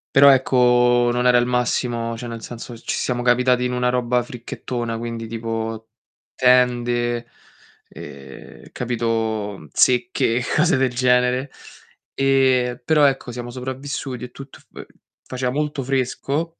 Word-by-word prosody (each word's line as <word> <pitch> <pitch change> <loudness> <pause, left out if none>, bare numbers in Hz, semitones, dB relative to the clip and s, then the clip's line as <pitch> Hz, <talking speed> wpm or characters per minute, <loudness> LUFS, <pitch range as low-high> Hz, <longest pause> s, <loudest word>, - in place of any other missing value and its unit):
Però 140 +1 +8
ecco, 125 -2 +4
non 125 +1 +1
era 125 - +5
il 120 - +2
massimo, 120 -1 -1
cioè 120 +1 -7
nel 115 -1 -7
senso, 120 0 -8
ci - - -4
siamo 120 -1 -2
capitati 125 0 +2
in 125 - -2
una 125 0 +1
roba 125 -1 0
fricchettona, 120 -1 -5
quindi 115 -1 -5
tipo 115 0 -5 0.5
tende, 120 -1 +2 0.6
ehm, 70 -1 -12
capito? 110 -6 -2
Zecche, 125 -2 +2
cose 170 0 +3
del 130 -2 +1
genere. 125 +1 +2 0.6
E, 130 -3 +2
però 155 -2 +3
ecco, 135 -2 -2
siamo 120 0 -6
sopravvissuti 130 0 -5
e 125 - -7
tutto 135 +1 -12
fa - - -10 0.4
faceva 125 -1 -3
molto 150 -1 -2
fresco, 135 +5 -2
125 Hz, 130 wpm, -21 LUFS, 120-130 Hz, 0.6 s, Però